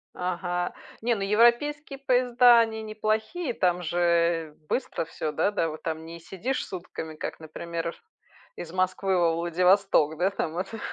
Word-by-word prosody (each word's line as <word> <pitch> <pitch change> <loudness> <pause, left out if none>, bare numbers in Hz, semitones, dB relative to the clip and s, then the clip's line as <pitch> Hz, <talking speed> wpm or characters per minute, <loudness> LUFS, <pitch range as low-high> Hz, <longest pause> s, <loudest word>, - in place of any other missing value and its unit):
Ага. 180 0 -2 0.3
Нет, 235 -1 +1
ну, - - -2
европейские 240 +8 +2
поезда- 245 -2 +5
они 220 -1 0
неплохие, 220 +8 -2
там 180 -3 +1
же 170 -2 +1
быстро 250 -10 -2
всё, 155 -1 -4
да, 200 - +1
да, 165 -6 0
вот 155 - -9
там 160 0 -4
не 170 +1 -9
сидишь 195 +10 -3
сутками, 170 -3 -7
как, - - -5
например, 165 +1 -5 0.6
из 170 0 -7
Москвы 185 0 +1
во 170 -2 +3
Владивосток, 175 -2 +3
да, 185 +2 +2
там 165 -4 -3
это? 195 +5 -4
180 Hz, 150 wpm, -27 LUFS, 170-220 Hz, 0.6 s, поезда